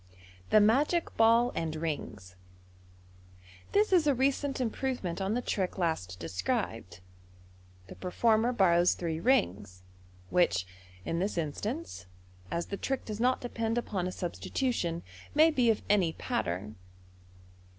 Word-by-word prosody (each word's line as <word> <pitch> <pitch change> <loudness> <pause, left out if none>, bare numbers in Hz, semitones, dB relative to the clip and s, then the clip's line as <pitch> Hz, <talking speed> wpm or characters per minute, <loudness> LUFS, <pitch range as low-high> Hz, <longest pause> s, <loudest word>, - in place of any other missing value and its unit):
The 215 - +6
Magic 280 +11 +2
Ball 230 +2 +4
and 160 -1 -3
Rings. 120 - -5 0.6
— 90 0 -24
This 410 -1 +3
is 335 -5 +4
a 285 - +4
recent 275 +1 0
improvement 240 -6 -2
on 195 +3 0
the 245 - -1
trick 190 -3 -2
last 160 - -2
described. 95 - -3 0.8
The - - -10
performer 220 +5 +1
borrows 180 -6 +4
three 165 -2 -3
rings, 100 - 0 0.5
which 135 - +2 0.4
in 165 - -1
this 195 +1 -1
instance, 170 - -4 0.4
as 170 0 -2
the 200 - -5
trick 270 +4 -3
does 215 -1 -5
not 250 +2 +2
depend 230 -1 -2
upon 195 -6 -2
a - - -3
substitution, 175 -1 -2 0.3
may 315 +2 +6
be 250 -6 +2
of 220 - +1
any 190 -6 +3
pattern. 95 - -3
190 Hz, 130 wpm, -30 LUFS, -, 0.8 s, The